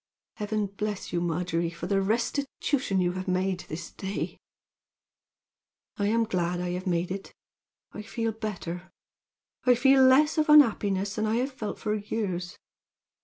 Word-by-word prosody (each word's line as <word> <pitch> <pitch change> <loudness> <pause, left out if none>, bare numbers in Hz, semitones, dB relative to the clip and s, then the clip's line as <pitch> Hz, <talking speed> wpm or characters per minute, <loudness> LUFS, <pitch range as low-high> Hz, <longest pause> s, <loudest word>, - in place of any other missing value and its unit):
Heaven 210 0 -1
bless 200 0 -4
you, 175 - +1
Margery, 170 0 -1
for 170 0 -7
the 195 +2 +1
restitution 235 0 0
you 175 -1 +2
have 185 +1 -3 0.4
this 155 - -6
day 190 - -7
made!" - - -3 1.6
"I 205 - +1
am 230 +2 +3
glad 180 -5 -1
I 180 0 -2
have 180 +2 -4
made 175 0 0
it. 195 +1 -5 0.6
I 210 - -7
feel 225 +1 -2
better 185 -5 -5 0.8
I 250 -1 +6
feel 270 +2 +5
less 295 +5 +5
of 305 - +1
unhappiness 205 -9 +5
than 215 0 -1
I 220 - +1
have 255 +4 0
felt 220 -5 -5
for 210 - -2
years. 200 -4 -3
205 Hz, 150 wpm, -27 LUFS, 180-230 Hz, 1.6 s, I